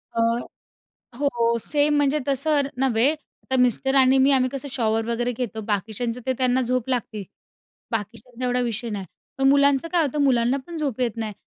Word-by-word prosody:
अ, 230 - +1 1.0
हो 235 -5 +1
सेम. 295 +3 +2
म्हणजे 290 +1 +2
तसं 285 +2 +2 0.2
नव्हे 260 +1 +2 0.4
तर - - +3
मिस्टर 250 +2 +2
आणि 265 0 +5
मी 265 +1 +4
आम्ही 255 -1 +3
कसं 275 +2 -6
शॉवर 225 -2 0
वगैरे 240 +1 -1
घेतो. 230 -2 -5
बाकीच्यांचं 220 +3 -3
ते 260 - +1
त्यांना 255 0 +2
झोप 255 0 -1
लागते. 230 -5 -3 0.7
बाकीच्यांचा 230 +3 -5
एवढा 250 0 0
विषय 235 0 -2
नाही. 200 -3 -5 0.3
पण 270 0 +2
मुलांचं 280 +1 +4
काय 345 -2 +3
होतं. 290 +1 -2
मुलांनापण 260 +4 0
झोप 275 -6 -3
येत 235 -3 -1
नाही. 220 -2 -4
250 Hz, 165 wpm, -23 LUFS, 230-275 Hz, 1.0 s, आणि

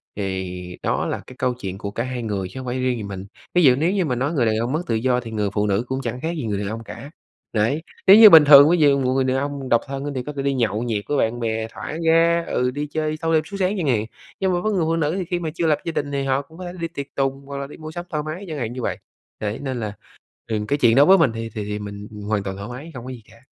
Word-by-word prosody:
thì 95 -2 -4
đó - - 0
là - - -3
cái 130 - -11
câu 125 -1 0
chuyện 95 -6 -6
của 100 0 -5
cả 115 - -2
hai 125 -1 -4
người 100 -4 -2
chứ 130 - -8
không 130 - -7
phải 120 - -2
chỉ 130 - -2
riêng 125 -1 0
gì 110 - -5
mình. 100 -1 -6 0.3
Ví 180 - +4
dụ 130 -4 +7
nếu 160 +7 +1
như 190 -4 +1
mà 125 - -1
nói 135 +6 -1
người 130 -7 +2
đàn 110 -1 +2
ông 120 +3 -1
mất 155 +4 0
tự 115 - 0
do 125 +2 +1
thì 115 -2 -8
người 105 -2 -1
phụ 105 0 +1
nữ 100 +3 +1
cũng 130 +1 -2
chẳng 125 -1 -4
khác 160 - -2
gì 145 - -3
người 105 -2 -2
đàn 100 - -3
ông 115 +1 -5
cả. 140 - -9 0.4
Đấy, 115 +8 +1 0.3
nếu 195 - +10
như 220 -2 +11
bình 160 -4 +9
thường 145 0 +9
ví 175 - +4
dụ 145 -3 +4
một 130 -1 +1
người 135 0 +2
đàn 130 0 +1
ông 140 -1 -3
độc 120 - +4
thân 140 +1 -4
thì 125 - -2
có 150 - -6
thể 140 - -3
đi 140 0 0
nhậu 115 -4 0
nhẹt 110 -4 -2
với 145 - 0
bạn 115 0 0
bè 110 -1 -2
thả 150 - -6
ga 165 +1 +4
ừ, 125 0 0
đi 145 +3 -4
chơi 155 0 -2
thâu 165 0 0
đêm 155 -1 +3
suốt 200 +5 -7
sáng 190 +2 +1
chẳng 165 -6 -1
hạn, 110 -4 +1 0.3
nhưng 190 -1 +1
mà 175 - +1
với 215 - 0
người 175 -4 +1
phụ 165 - +1
nữ 160 0 0
thì 185 - -3
khi 175 +1 -2
mà 165 -2 -3
chưa 170 -1 0
lập 150 - +3
gia 165 - -1
đình 145 -2 -3
thì 140 -1 -1
họ 135 +1 +1
cũng 160 +3 -17
có 185 - -7
thể 175 - -5
đi 165 - -2
tiệc 140 -4 -6
tùng 135 0 -1
hoặc 140 0 -6
là 140 0 -4
đi - - -12
mua 155 0 -8
sắm 175 +2 -6
thoải 150 -3 -2
mái 160 +6 -6
chẳng 155 -3 -5
hạn 120 -3 -3
như 125 - -5
vậy. - - -2 0.4
Đấy, 105 +1 -3
nên 130 -3 -3
là, 105 -2 -4 0.5
ừm, 105 -2 -2
cái 145 - +1
chuyện 120 -5 +4
đó 140 +2 +7
với 195 +3 +7
mình 160 -9 +3
thì 115 0 -5
thì 105 - -3
thì 105 0 -4
mình, 100 0 -7
ừm, 105 - -9
hoàn 105 -1 -1
toàn 95 -1 -5
thoải 100 +3 -7
mái, 145 +7 -8
không 125 -1 -8
có 130 - -6
gì 125 - -9
cả. 115 +2 -20
130 Hz, 325 wpm, -22 LUFS, 110-155 Hz, 0.5 s, như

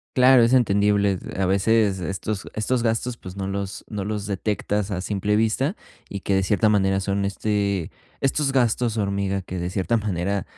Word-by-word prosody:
Claro, 130 0 +6
es 115 +2 +3
entendible, 100 -4 +3 0.2
a 95 - +1
veces 100 +1 +2
estos 95 +3 -4
estos 120 +3 0
gastos, 115 +1 -1
pues, 95 -5 -10
no 95 - -3
los 100 0 -4
no 105 -2 -4
los 105 -1 -3
detectas 105 0 -2
a 90 -2 -2
simple 105 +1 -1
vista 115 - +1 0.3
y 100 - -5
que 100 - -1
de 95 - +3
cierta 105 +3 +2
manera 95 -2 +2
son, 100 +1 -1
este 100 -3 -1 0.3
estos 135 +1 +1
gastos 120 -3 +1
hormiga, 100 -2 -1
que 90 0 -5
de 85 - -2
cierta 95 +5 0
manera, 100 -2 -2
100 Hz, 175 wpm, -23 LUFS, 95-110 Hz, 0.3 s, Claro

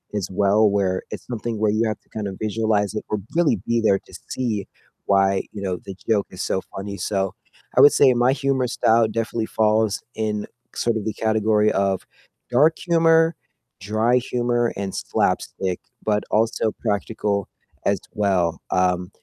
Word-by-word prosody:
as 100 -3 -1
well, 100 +3 +3
where 95 -2 0
it's - - -7
something 115 -2 -4
where 110 0 +2
you 110 +2 +1
have 110 -2 -3
to - - -37
kind 105 -2 -4
of 95 - -5
visualize 110 -1 0
it 105 - -4
or 105 - -1 0.2
really 170 -2 +3
be 115 0 +2
there 100 -3 +3
to - - -21 0.2
see 110 -6 -2 0.4
why, 95 -1 +3
you 100 - -6
know, 95 -2 -2
the 95 - -7
joke 105 -3 +2
is 95 - -7
so 95 - -1
funny, 100 +1 -5
so 95 +1 -1 0.4
I 130 - +8
would 145 - +8
say 135 -3 +5
my 120 +2 +3
humor 135 -3 0
style 115 -1 +3
definitely 115 +1 -2
falls 110 -1 +1
in 105 -1 -2 0.3
sort 115 -1 0
of 105 - -5
the 110 - -1
category 110 -1 +2
of 95 -1 0 0.5
dark 150 +6 +4
humor, 165 -1 +3 0.5
dry 110 +5 +2
humor, 120 -1 0
and 100 -1 -3
slapstick, 95 -2 -1 0.2
but 105 -1 +1
also 110 0 +1
practical 105 -2 -1 0.4
as - - +2
well, 90 -5 +1
um, 90 0 +1
110 Hz, 170 wpm, -22 LUFS, 100-115 Hz, 0.5 s, I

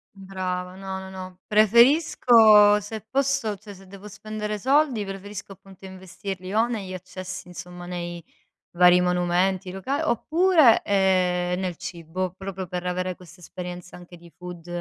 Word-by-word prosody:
Brava, 185 -1 -5
no, 190 0 -6
no, 190 0 -9
no. 185 -1 -9
Preferisco 220 - +5
se 215 +2 -7
posso 270 -4 0
cioè 205 +1 -12
se 195 0 -16
devo 200 +2 -12
spendere 210 +1 -5
soldi, 265 -1 +1
preferisco 195 +1 -8
appunto 195 0 -15
investirli 190 0 -8
o 225 +2 +3
negli 205 -6 -5
accessi 185 0 -8
insomma 180 0 -10
nei 175 -1 -6 0.5
vari 180 0 +6
monumenti 180 +1 0
loca 275 - -3
oppure, 320 - +4
ehm, 180 -2 +1
nel 185 -2 -3
cibo 175 +1 -5
proprio 190 -1 -6
per 180 0 -5
avere 180 0 -2
questa 180 -1 -16
esperienza 180 0 -8
anche 175 0 -13
di 170 0 -16
food 180 -2 -10
190 Hz, 140 wpm, -24 LUFS, 180-210 Hz, 0.5 s, vari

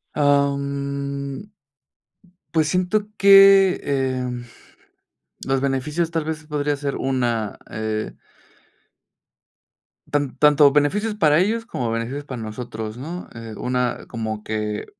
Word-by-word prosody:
Am. 140 +3 -1 1.0
Pues, 155 -2 +2
siento 185 +4 0
que, 195 -1 +7
em, 130 -3 -2 1.0
los 135 0 +1
beneficios, 140 +5 -1
tal 165 -2 -2
vez, 155 0 -4
podría 150 -1 -1
ser 140 0 -3
una, 120 -5 -1
eh 110 0 -3 2.0
Tan 145 -3 -1
tanto 150 -1 +6
beneficios 200 +10 +1
para 155 -6 +4
ellos 225 +5 0
como 125 - -3
beneficios 115 +5 -3
para 130 -5 -7
nosotros, 110 0 -6
¿no?, 165 +8 -7
eh, 115 -1 -8
una 125 0 -1
como 110 -2 -4
que, 105 -1 -3
140 Hz, 110 wpm, -22 LUFS, 125-155 Hz, 2.0 s, que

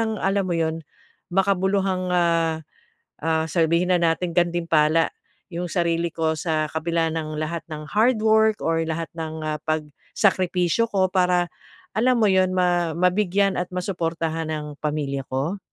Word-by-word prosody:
ng 220 -1 0
alam 195 +1 +1
mo 175 - -1
'yon, 160 0 -1 0.5
makabuluhang, 190 -1 +1
ah, 165 -2 +2 0.6
ah, 160 0 +1
sabihin 170 +3 +2
na 175 - +3
nating 170 +1 +1
gantimpala 165 -2 +2 0.4
yung 175 +1 -3
sarili 170 -1 +1
ko, 160 -1 0
sa 155 -2 0
kabila 165 0 0
ng 155 -1 -4
lahat 160 +1 -3
ng 155 -1 -6
hardwork 220 -1 +3
or 165 0 +1
lahat 165 0 -3
ng, 160 -1 -5
ah, 150 -1 -2
pagsakripisyo 180 +6 0
ko. 190 -3 +2
Para 180 -2 +2 0.4
alam 245 +4 +2
mo - - +5
'yon, 185 -1 +3
ma-mabigyan 180 +3 +2
at 180 0 -2
masuportahan 165 -3 -2
ang 150 -1 -4
pamilya 145 -2 -2
ko? 150 +10 -2
170 Hz, 135 wpm, -23 LUFS, 160-185 Hz, 0.6 s, mo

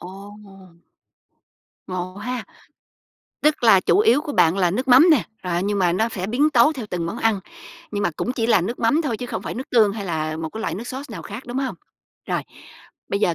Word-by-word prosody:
Ồ! 195 -1 -12 1.1
Ngộ 185 0 -5
ha? 240 +3 -4 1.0
Tức 300 -2 +2
là 195 -4 +7
chủ 385 - +2
yếu 425 -7 +4
của 300 -1 -5
bạn 165 - +3
là 180 -2 +3
nước 255 +9 -2
mắm 265 +8 +7
nè, 300 -8 +4 0.2
rồi 180 - -3
á 175 - +1
nhưng 200 +2 -1
mà 180 -2 +2
nó 220 +6 +1
sẽ 190 -5 -4
biến 270 +8 +2
tấu 270 +2 +5
theo 255 -7 -6
từng 170 -2 -2
món 205 +8 -5
ăn, 225 -4 +1 0.5
nhưng 205 -1 -2
mà 175 - +1
cũng 245 - -2
chỉ 230 -3 -1
là 230 - +4
nước 225 +8 -3
mắm 285 +8 +2
thôi 260 -8 -2
chứ 245 - -6
không - - -5
phải - - -5
nước 265 +5 -7
tương 220 -4 +4
hay 205 -1 -5
là 155 -3 -2
một 160 0 -4
cái 220 - -6
loại - - -2
nước 210 +6 -6
sauce, 265 0 -7
nào - - -7
khác, 210 +5 -8
đúng 245 +2 -3
hông? 270 -1 -2 0.5
Rồi. - - 0 0.7
Bây 200 - -1
giờ 175 - +2
220 Hz, 235 wpm, -22 LUFS, 185-255 Hz, 1.1 s, là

